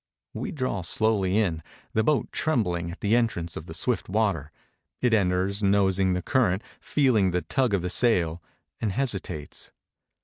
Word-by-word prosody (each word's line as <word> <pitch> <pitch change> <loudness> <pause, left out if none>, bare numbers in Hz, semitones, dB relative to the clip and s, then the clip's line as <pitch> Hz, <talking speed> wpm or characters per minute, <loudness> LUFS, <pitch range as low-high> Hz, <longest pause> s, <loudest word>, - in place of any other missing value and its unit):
We - - -4
draw 130 - -2
slowly 100 +1 +1
in, 90 -7 +1 0.3
the 110 - +2
boat 145 +4 +1
trembling 90 - 0
at 85 - -9
the 105 +3 +3
entrance 100 -9 0
of - - -7
the - - -7
swift - - -1
water; 95 -8 0 0.5
it 125 -2 +2
enters, 95 0 +1
nosing 95 -2 +3
the 90 -1 -2
current, 115 -6 +1 0.2
feehng 115 -10 +2
the 90 0 -1
tug 130 -6 +1
of 90 - -2
the 90 - -1
sail, 90 -8 +1 0.4
and 110 - -1
hesitates. 100 - -3
100 Hz, 160 wpm, -26 LUFS, 90-115 Hz, 0.5 s, the